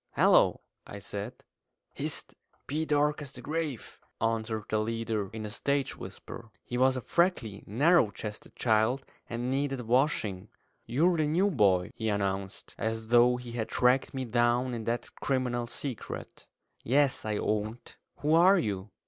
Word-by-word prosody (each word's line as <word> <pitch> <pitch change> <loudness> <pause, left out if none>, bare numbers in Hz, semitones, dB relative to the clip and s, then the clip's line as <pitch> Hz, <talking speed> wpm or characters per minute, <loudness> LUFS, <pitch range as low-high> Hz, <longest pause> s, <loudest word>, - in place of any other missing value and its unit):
"Hallo!" - - +4 0.4
said - - -6 0.6
I. - - -8
"Hist! - - -1 0.3
Be 155 +3 -1
dark 150 0 +2
as 140 -2 -8
the - - -9
grave!" 155 -5 -4 0.2
answered 110 -1 -1
the 110 - 0
leader, 110 -2 -2
in 110 +1 -6
a 105 - -5
stage 140 +4 -1
whisper. 105 +5 -9
He 125 - -6
was 130 +1 +3
a - - -3
freckly, 145 - 0
narrow 145 - +4
chested 105 +1 -8
child, 115 +3 +2 0.2
and 120 +2 -2
needed 135 -1 -1
washing. 115 -5 0 0.4
"You're 165 +9 +3
the 155 -1 +2
new 185 +7 +2
boy," 95 - +3
he 110 -2 -2
announced, 100 -1 -2
as 110 0 -2
though 120 +1 +5
he 125 -1 -8
had 115 -2 -3
tracked 125 +2 +3
me 130 -1 -2
down 120 +2 +2
in 115 -2 -4
that 120 0 -1
criminal 125 -3 0
secret. 125 0 -7 0.4
"Yes," 140 +2 +2
I 105 -1 -1
owned. 110 +3 -2 0.3
"Who 150 +2 +2
are 180 +4 +7
you?" 105 - -2
120 Hz, 155 wpm, -29 LUFS, 110-140 Hz, 0.6 s, are